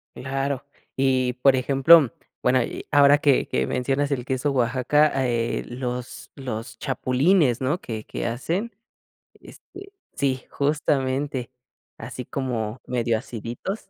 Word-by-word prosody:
Claro. 135 +1 -3 0.3
Y, 130 -2 +2
por 130 +2 +4
ejemplo, 135 +2 +5 0.3
bueno, 125 0 +3
y, - - -6
ahora 145 0 +6
que 145 -4 +3
que 65 +1 -1
mencionas 135 - -1
el 125 -3 -1
queso 130 +2 -1
Oaxaca, 130 +4 +2 0.2
eh, 115 -1 -1
los 125 0 -6
los 125 -4 -6
chapulines, 135 0 +2
¿no?, 145 +7 0
que 110 -7 -6
que - - -5
hacen, 170 - -2 0.7
este 395 +2 -13 0.2
Sí, 130 -2 -1
justamente, 140 -3 -1 0.5
así 125 - -7
como 120 -4 -3
medio 120 -2 0
aciditos. 120 - -6
130 Hz, 120 wpm, -24 LUFS, 125-145 Hz, 0.7 s, ahora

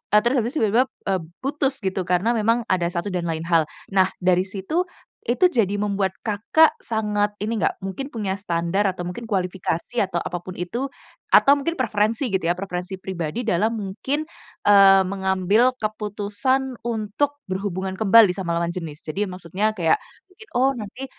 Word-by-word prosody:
eee, - - +9
terus 240 +3 +2
habis 235 +3 -2
tiba-tiba, 225 -1 +3 0.3
eee, 190 - +1 0.2
putus 275 -1 0
gitu 190 0 -1
karena 180 +6 +2
memang 230 +2 +2
ada 175 -2 +2
satu 175 +3 -3
dan 175 -2 -2
lain 160 0 -2
hal. 165 -2 +2 0.2
Nah, 190 -1 +4 0.2
dari 185 +1 +3
situ, 210 - -2 0.3
itu 250 +10 +2
jadi 210 - +2
membuat 200 -2 -1
Kakak 225 +9 +3
sangat 210 -2 -1
ini 215 +1 -2
enggak, - - +1
mungkin 270 +9 -5
punya 205 -6 -3
standar 190 +1 0
atau 180 -1 -5
mungkin 225 +6 -6
kualifikasi 185 +2 -1
atau 190 -3 -1
apapun 175 +1 -5
itu, 235 +10 -3 0.4
atau 280 - +6
mungkin 285 +4 -1
preferensi 220 0 0
gitu 190 - +2
ya, 175 - +1
preferensi 185 0 -5
pribadi 185 +4 -4
dalam 210 +1 +2
mungkin, 230 +10 -3 0.4
eee, 195 -1 +7
mengambil 190 +5 +2
keputusan 215 +5 -1
untuk 235 +5 -1
berhubungan 190 0 -3
kembali 215 -2 +7
sama 170 -3 -2
lawan 170 0 -1
jenis? 160 -5 -7
Jadi 195 +6 -2
maksudnya 190 +4 -2
kayak 165 -2 +2 0.2
mungkin, 405 +3 -17
"Oh 265 +2 +3
nanti 240 +3 -7
200 Hz, 160 wpm, -23 LUFS, 185-230 Hz, 0.4 s, eee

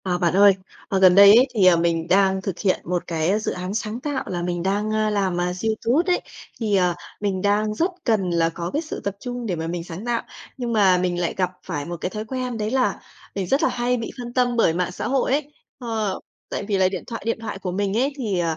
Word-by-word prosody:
À 180 -2 0
bạn 175 -2 +1
ơi, 200 +1 +7 0.4
ờ, 195 - +1
gần 185 -1 +7
đây 200 +1 +9
ấy, 250 +3 +6
thì, 205 -5 +3
ờ, 180 -2 +7
mình 165 -1 0
đang 190 +1 +3
thực 190 -2 -4
hiện 190 -3 +1
một 180 +1 -2
cái 170 +5 +1
dự 215 - -2
án 180 +2 -4
sáng 220 +1 -3
tạo 285 0 -3
là 175 -2 -3
mình 175 0 -2
đang 205 +3 0 0.2
làm 195 -4 0 0.2
YouTube 225 - 0
ấy, 360 - +2 0.4
thì, 215 -3 +1
à, 180 -2 +2 0.3
mình 195 -3 -1
đang 210 +1 +1
rất 340 - 0
cần 210 -6 +1
là 165 -1 +2
có 170 +1 -5
cái 300 - 0
sự 310 - -6
tập 200 -1 -3
trung 245 -1 -5
để 190 -5 -1
mà 160 0 -4
mình 170 0 -3
sáng 175 +5 -8
tạo. 240 -1 0 0.4
Nhưng 240 -2 -3
mà 195 -4 +5
mình 180 -1 -1
lại 175 - -1
gặp 185 -1 +1
phải 145 -6 -4
một 175 +1 -5
cái - - -1
thói 215 +2 -5
quen 255 0 -3
đấy 215 0 -2
là 260 -1 +1 0.4
mình 195 -2 -2
rất 275 +9 +2
là - - +4
hay 245 +1 0
bị 225 - -5
phân 240 -1 -6
tâm 245 -1 +2
bởi 170 -8 +4
mạng 180 +1 -1
xã - - -4
hội 265 -1 +1
ấy. 290 +1 0 0.3
Ờ, 220 -5 -2 0.3
tại - - -3
vì 200 -1 -1
là 185 -1 +3
điện 185 -2 -5
thoại 230 - -5
điện 230 0 -1
thoại 220 -3 -5
của 185 -2 -4
mình 200 +2 -1
ấy, 270 +4 +1
thì 205 -9 -1
200 Hz, 250 wpm, -23 LUFS, 180-230 Hz, 0.4 s, đây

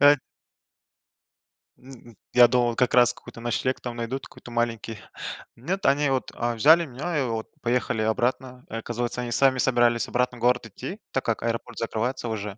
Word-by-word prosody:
Э 145 +1 +8 1.6
М, 125 -3 -14 0.2
я 120 -1 +8
думал, 120 -1 +2
как 125 0 +1
раз 125 -1 +5
какой-то 120 -1 -12
ночлег 120 +2 -1
там 120 -1 -5
найдут, 120 +3 -4
какой-то 120 - -13
маленький. 115 -2 -2 0.6
Нет, 180 +11 -3
они 140 +1 +3
вот, 130 -1 -1
э, 120 0 -1
взяли 160 +9 +6
меня 150 +5 -4
и - - +1
вот 115 -3 -3
поехали 120 -2 0
обратно. 125 +3 -1
Оказывается, 120 +2 -3
они 120 -1 -4
сами 130 +1 +3
собирались 120 -2 +3
обратно 125 0 0
в - - -14
город 125 0 +2
идти, 180 - -7
так 135 - -1
как 115 -1 -1
аэропорт 115 0 -3
закрывается 115 +2 -2
уже. 105 -2 -4
120 Hz, 165 wpm, -25 LUFS, 115-130 Hz, 1.6 s, Э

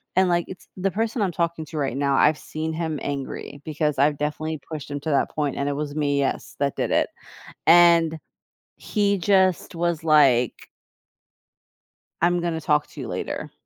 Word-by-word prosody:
and, 185 -1 +4
like, 175 -1 +1
it's 190 - -11
the 190 +1 0
person 225 +3 -1
I'm 190 -3 +1
talking 170 -1 -2
to 155 +1 -7
right 135 -2 -1
now, 140 -1 +1
I've 150 +2 +4
seen 160 +1 -4
him 160 -2 -3
angry 140 0 -5
because 150 -2 -1
I've 145 +1 +3
definitely 155 +1 -3
pushed 155 -3 -6
him 145 - -3
to 160 - -4
that 140 - +1
point, 145 -3 -2
and 140 - -2
it - - -1
was 145 0 -4
me, 145 -2 +1
yes, 140 - -2
that 140 -1 0
did - - -2
it, - - +2 0.6
and 170 -2 +6 0.6
he 200 -1 0
just 190 -1 +2
was, 170 -1 -1
like 135 -7 +3 1.5
"I'm 175 +1 +3
gonna 165 -2 -2
talk 150 -1 +1
to - - -10
you - - -5
later," - - -4
155 Hz, 180 wpm, -24 LUFS, 145-175 Hz, 1.5 s, and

